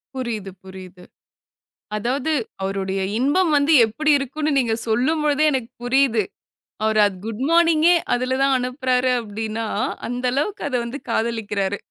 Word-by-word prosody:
புரியுது, 225 -7 -4
புரியுது. 185 -1 -12 0.9
அதாவது 255 +8 -1 0.3
அவருடைய 195 0 -2 0.2
இன்பம் 315 +8 +2
வந்து 290 +3 +3
எப்படி 305 +8 -1
இருக்கும்னு 295 +3 -2
நீங்கச் 230 -3 0
சொல்லும் 260 +9 +1
பொழுதே 295 +1 +2
எனக்குப் 255 -4 -4
புரியுது. 245 -3 +3 0.6
அவர் 220 0 +2
அது 200 -2 -3
குட்மார்னிங்கே 325 +8 +3 0.2
அதுல 255 +1 -1
தான் 275 0 +3
அனுப்புறாரு 255 0 0
அப்டின்னா, 220 +1 -4 0.4
அந்த 245 +1 -4
அளவுக்கு 345 - -2
அத 260 - -6
வந்து 245 +5 -6
காதலிக்கிறாரு. 210 -4 -1
250 Hz, 125 wpm, -21 LUFS, 220-280 Hz, 0.9 s, வந்து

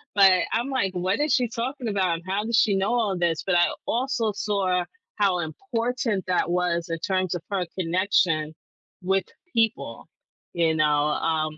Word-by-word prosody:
but 195 -2 +7 0.2
I'm, 240 +4 0
like, 230 -9 0
"What 185 +3 -1
is 300 0 +2
she 250 -2 +2
talking 250 +2 -4
about? 190 -4 +1
And 165 - -8
how 195 +2 -1
does 230 +1 0
she 215 -3 +4
know 195 +4 +1
all 215 -6 +1
this?" 170 -2 0
But 190 - +1
I 175 0 +5 0.2
also 240 -2 0
saw 195 -3 0 0.3
how 195 -4 +2
important 230 - -2
that 180 -1 +1
was 175 -1 0
in 165 0 -3
terms 185 0 -1
of 175 - -4
her 190 -3 0
connection 165 -3 +1 0.5
with 190 0 +1 0.3
people, 225 0 -1 0.5
you 165 -2 +2
know, 155 -1 +3 0.2
um, 155 0 -1
190 Hz, 170 wpm, -25 LUFS, 175-225 Hz, 0.5 s, but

